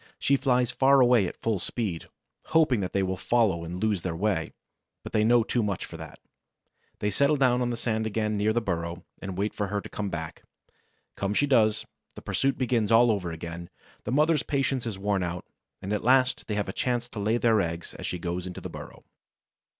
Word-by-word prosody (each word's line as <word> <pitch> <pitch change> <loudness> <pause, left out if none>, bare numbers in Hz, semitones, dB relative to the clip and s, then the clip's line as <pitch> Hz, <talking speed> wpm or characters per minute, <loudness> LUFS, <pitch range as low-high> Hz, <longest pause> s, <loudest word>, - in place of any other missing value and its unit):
She 140 - +2
flies 125 -2 +2
far 135 +3 +4
away 120 -6 +5
at - - -7
full 110 -4 +1
speed, 90 -1 -4 0.4
hoping 155 -8 +3
that 90 -2 -3
they 100 - +1
will 95 0 -2
follow 100 -5 +1
and 85 +2 -5
lose 105 -3 0
their 85 -2 -3
way. 90 -3 -1 0.5
But - - -9
they 105 - +3
know 120 +1 +5
too 120 +2 0
much 100 -4 -2
for - - -11
that. 80 -1 -10 0.8
They 105 - -1
settle 140 +8 +3
down 125 -2 +3
on 120 - 0
the 120 - -2
sand 110 -2 -1
again 110 0 -1
near 105 +1 +2
the 120 +2 +1
burrow 85 -3 -3 0.2
and 95 -1 -5
wait 105 +2 -1
for 105 - -2
her 105 +1 -2
to - - -9
come 100 -1 -3
back. 80 -1 -6 0.7
Come 100 +1 -2
she 145 - +3
does; 110 -6 +3 0.3
the - - -9
pursuit 135 -1 0
begins 120 -4 0
all 115 +1 +6
over 90 -5 -2
again; 85 +1 -7 0.3
the 110 - -4
mother's 150 +2 +3
patience 135 -4 -1
is 105 -4 -4
worn 100 0 0
out, 90 -1 -4 0.4
and 100 +2 -2
at 105 - -1
last 130 +1 +3
they 105 - -2
have 105 -1 -1
a 95 - -4
chance 120 -1 -1
to 110 - -7
lay 110 +3 +1
their 115 -3 +3
eggs 85 -1 -4
as - - -6
she 90 - -3
goes 90 +1 -4
into 90 - -7
the - - -7
burrow. - - -10
105 Hz, 220 wpm, -27 LUFS, 95-120 Hz, 0.8 s, all